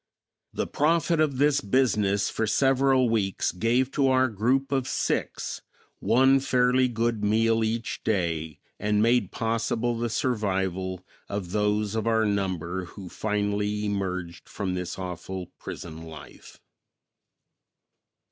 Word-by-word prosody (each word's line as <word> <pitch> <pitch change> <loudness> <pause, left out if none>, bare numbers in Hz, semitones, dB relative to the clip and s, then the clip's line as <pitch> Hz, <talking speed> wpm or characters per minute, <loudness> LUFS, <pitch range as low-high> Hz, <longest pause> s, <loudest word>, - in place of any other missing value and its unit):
The - - -2
profit 165 +2 +1
of 150 -4 +2
this 145 +1 +3
business 105 -3 +2
for 110 - -1
several 135 +2 +3
weeks 105 -4 0
gave 120 +7 +1
to 140 -2 +2
our 130 0 +3
group 125 +6 0
of 135 -2 0
six - - -2 0.4
one 135 +2 +4
fairly 130 -1 +3
good 115 -2 -1
meal 115 +2 +2
each 115 +1 -2
day 85 -7 -1 0.2
and 105 0 +1
made 115 -4 +2
possible 115 +1 -1
the 120 +1 -2
survival 95 -6 -1 0.2
of 100 -3 -4
those 105 0 0
of 110 0 -1
our 110 -1 +3
number 95 -3 -2
who 95 +1 -10
finally 105 0 -1
emerged 90 -4 -3
from 95 -3 -3
this 90 -1 -4
awful 90 0 -6
prison 80 -1 -8
life. 80 -3 -12
110 Hz, 125 wpm, -26 LUFS, 95-125 Hz, 0.4 s, one